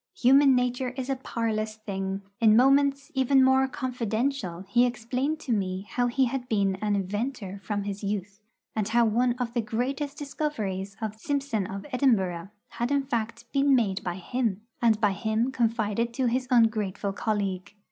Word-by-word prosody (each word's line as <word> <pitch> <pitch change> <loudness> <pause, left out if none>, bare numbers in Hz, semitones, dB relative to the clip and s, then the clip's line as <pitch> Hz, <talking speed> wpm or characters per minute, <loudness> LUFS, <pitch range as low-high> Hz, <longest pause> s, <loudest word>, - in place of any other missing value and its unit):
Human 270 +2 +5
nature 250 0 -1
is 260 +1 -2
a - - +1
parlous 220 -4 -2
thing. 195 -2 -4 0.2
In 220 -2 +6
moments 275 +3 +3
even 265 0 +4
more 265 0 +4
confidential 235 -6 -2
he 240 +5 +4
explained 250 +6 -2
to 260 - -4
me 190 -2 -2
how 245 -1 0
he 260 +2 +2
had 250 0 -3
been 200 -3 +2
an 210 +1 0
inventor 200 +1 -3
from 205 -1 -2
his 200 +1 -5
youth, 200 0 -4 0.3
and 215 -2 0
how 235 +1 +3
one 240 +3 +2
of 245 -1 -4
the 240 - +1
greatest 270 +6 -3
discoveries 215 -10 -3
of 215 0 -4
Simpson 275 -8 -1
of 195 0 -6
Edinburgh 195 -10 +1 0.2
had 240 +1 -2
in 280 -1 +2
fact 235 -2 -3
been 275 0 +4
made 200 -6 0
by 175 -1 -3
him, 215 +1 -2 0.2
and 225 -3 +4
by 210 -2 +3
him 220 +5 0
confided 230 -1 0
to 260 - 0
his 250 +2 0
ungrateful 215 -5 +2
colleague. 200 -2 -2
230 Hz, 165 wpm, -27 LUFS, 205-260 Hz, 0.3 s, In